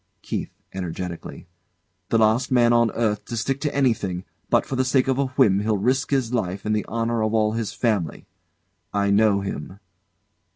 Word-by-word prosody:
KEITH. - - -3 0.2
[Energetically] 90 -1 -6 0.6
The 115 - +3
last 110 +4 +2
man 120 -2 +4
on 120 -1 +4
earth 105 -3 0
to 120 - -5
stick 135 +4 -1
to 150 -2 -2
anything! 105 -9 0 0.2
But - - +3
for 135 - -4
the 130 - +2
sake 130 0 +2
of 130 0 +1
a 140 - +2
whim 100 -1 +5
he'll 105 0 +1
risk 130 +7 +1
his 130 -4 0
life 100 -4 -2
and 110 0 +1
the 105 - -2
honour 115 0 -1
of 110 +1 0
all 110 -1 +3
his 115 -1 -2
family. 105 -9 -1 0.7
I 100 -1 +1
know 100 -1 +4
him. 95 0 -6
110 Hz, 180 wpm, -23 LUFS, 100-120 Hz, 0.7 s, whim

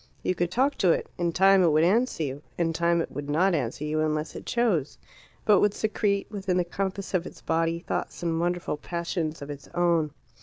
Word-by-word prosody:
You - - +1
could 175 -1 -1
talk 265 +9 +1
to 180 - +5
it; - - 0
in 170 -1 +1
time 195 +2 +5
it 175 - +5
would 155 +1 +4
answer 215 0 +2
you; 140 0 -4 0.2
in 165 -1 +1
time 170 +1 +2
it - - -5
would 145 0 -6
not 180 +6 +3
answer 140 -2 -2
you 155 +1 -1
unless 155 0 -1
it - - -8
chose, 210 - +1 0.5
but 210 -2 +6
would 205 -1 +2
secrete, 205 -2 0
within 195 -3 -1
the 180 - +3
compass 195 +2 -4
of 180 -1 0
its - - -12
body, 165 +1 0
thoughts - - -4
and 165 -1 0
wonderful 175 -2 -1
passions 170 -2 -3
of 145 - -6
its 140 -1 -10
own. 170 -3 +2
170 Hz, 215 wpm, -27 LUFS, 155-190 Hz, 0.5 s, but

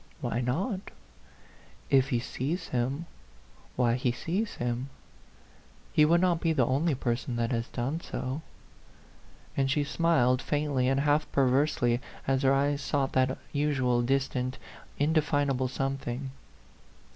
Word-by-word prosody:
" - - -29
Why 120 - -1
not? 185 - -2 1.0
If 135 0 +4
he 125 - +2
sees 135 +8 -3
him, 130 +6 -1 0.7
why 120 -2 +3
he 125 0 +1
sees 180 - -2
him. 120 +2 -2 1.0
He 150 - +6
would 170 +3 +4
not 180 -3 +2
be 165 -1 +2
the 130 -6 +3
only 140 +5 +1
person 125 0 -2
that 115 0 0
has 115 -1 -1
done 135 +7 -3
so 130 0 -4 0.6
;" - - -27
and 135 -1 +1
she 145 +1 +2
smiled 140 -5 +2
faintly 145 -4 0
and 135 +1 +2
half 150 +1 +1
perversely, 130 -2 +2 0.2
as 135 0 +1
her 135 -1 +4
eyes 140 +1 +2
sought 140 -2 0
that 130 0 +2 0.2
usual 135 -5 +1
distant, 130 0 0 0.4
indefinable 145 -3 +1
something. 135 0 -3
135 Hz, 135 wpm, -29 LUFS, 125-150 Hz, 1.0 s, He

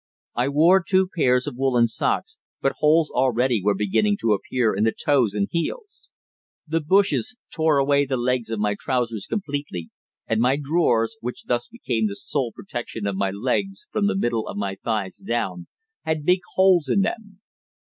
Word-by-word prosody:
I 125 +3 0
wore 165 +7 +5
two 185 +1 +2
pairs 125 -6 +3
of 120 - -5
woollen 130 -3 +3
socks, 435 - -2 0.2
but - - +1
holes 155 +1 +3
already 125 -3 +1
were 100 0 +2
beginning 200 - +1
to 110 -2 +3
appear 115 +3 0
in 100 - 0
the 110 - +3
toes 125 -8 +1
and 100 -1 0
heels. 415 - -4 0.6
The 165 +1 0
bushes 200 +8 +2 0.2
tore 160 -2 +2
away 140 0 +3
the 130 -1 -1
legs 125 -1 -1
of 115 - -2
my 105 0 +1
trousers 120 -5 -2
completely, 145 - -4 0.3
and 115 0 0
my 125 +3 +3
drawers, 145 -5 +1
which 125 +1 -5
thus 120 0 -1
became 120 - -2
the 100 - -5
sole 130 -1 -1
protection 120 - -6
of 100 -1 -1
my 100 0 0
legs 135 - -2
from 205 -1 +1
the 205 -1 0
middle 120 - -1
of - - -6
my 100 -1 -2
thighs 105 -5 -2
down, 95 -7 -3 0.4
had 155 -2 -2
big 180 +2 +4 0.2
holes 185 -6 +4
in 195 - +3
them. 205 -1 -4
130 Hz, 175 wpm, -23 LUFS, 115-170 Hz, 0.6 s, wore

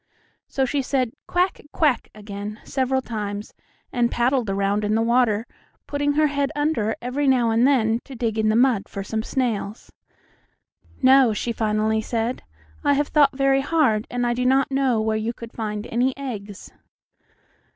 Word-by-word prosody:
So 270 - 0
she 280 +2 0
said 255 -3 0 0.2
"Quack! 360 +1 0
quack!" 295 -7 +1
again, 210 0 -7
several 265 0 -1
times, 210 -3 -5 0.4
and 240 -1 +2
paddled 240 -2 +1
around 200 +1 0
in 210 +1 +1
the 225 - +2
water, 235 -2 +2 0.4
putting 290 0 0
her 305 +1 +3
head 285 -1 0
under 290 -8 0
every 270 +4 -1
now 245 -4 +3
and 230 +3 +4
then 230 -5 +2
to 270 - -10
dig 225 -2 -2
in 215 0 +2
the 215 - +2
mud 240 -4 +2
for 195 - -5
some 220 +2 -2
snails. 225 -4 -3 1.1
"No," 260 -3 +6
she 235 +3 -2
finally 220 -1 0
said, 230 +2 -2 0.4
"I 285 - +4
have 290 +1 0
thought 285 -3 +3
very 275 0 +3
hard, 275 -8 +1
and 245 0 -1
I 240 - +1
do 250 +1 -2
not 265 +2 +2
know 265 -4 +2
where 220 0 0
you 220 +2 -2
could 230 -1 -10
find 210 -1 -4
any 250 +3 0
eggs." 210 -7 -7
240 Hz, 170 wpm, -23 LUFS, 215-270 Hz, 1.1 s, No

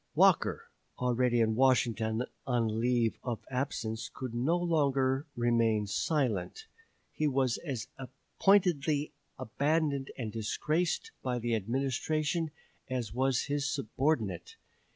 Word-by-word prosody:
Walker, - - +3 0.3
already 125 -1 +2
in 110 -1 +2
Washington 115 -2 +2 0.2
on 115 -3 +1
leave 120 -1 +1
of 120 -3 -4
absence, 125 -4 -2
could 130 -3 -6
no 135 +9 +1
longer 140 -5 +1
remain 115 -3 +2
silent. 145 - -1 0.5
He 155 - 0
was 130 -3 +1
as 130 -9 -5 0.5
pointedly 160 -7 +3 0.2
abandoned 140 +2 0
and 115 -5 -4
disgraced 155 - -1
by 125 -1 -1
the 120 0 -1
Administration 140 - 0 0.4
as 125 -5 -3
was 130 0 +1
his 145 0 -1
subordinate. 120 - -1
130 Hz, 110 wpm, -31 LUFS, 115-145 Hz, 0.5 s, Walker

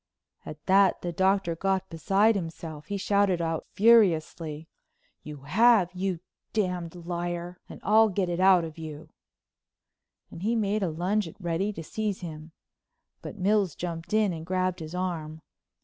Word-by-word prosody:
At 155 -1 -9
that 195 -1 +4
the 175 - -2
Doctor 190 -1 +1
got 190 +1 -1
beside 195 +7 +3
himself. 165 -5 -6
He 200 - -3
shouted 200 -2 +2
out 165 -1 -2
furiously: 165 -8 +3 0.5
"You 150 -2 -9
have, 205 +4 +4
you 185 -2 -2 0.3
d——d 180 -5 -2
liar, 175 0 -4
and - - -10
I'll 220 +2 +5
get 195 -1 -1
it 175 0 -2
out 185 -2 +5
of 160 0 -8
you," 155 -1 -8 1.2
and 165 - -9
he 225 +4 0
made 210 -1 0
a 190 - 0
lunge 180 +5 -1
at 165 - -12
Reddy 175 +3 -1
to 165 - -7
seize 210 +3 -3
him. 160 -2 -8 0.7
But - - -8
Mills 195 -3 +1
jumped 170 -1 -6
in 215 -3 +2
and 160 -1 -6
grabbed 185 +1 -1
his 160 +1 -7
arm. 160 -4 -4
180 Hz, 155 wpm, -27 LUFS, 165-200 Hz, 1.2 s, I'll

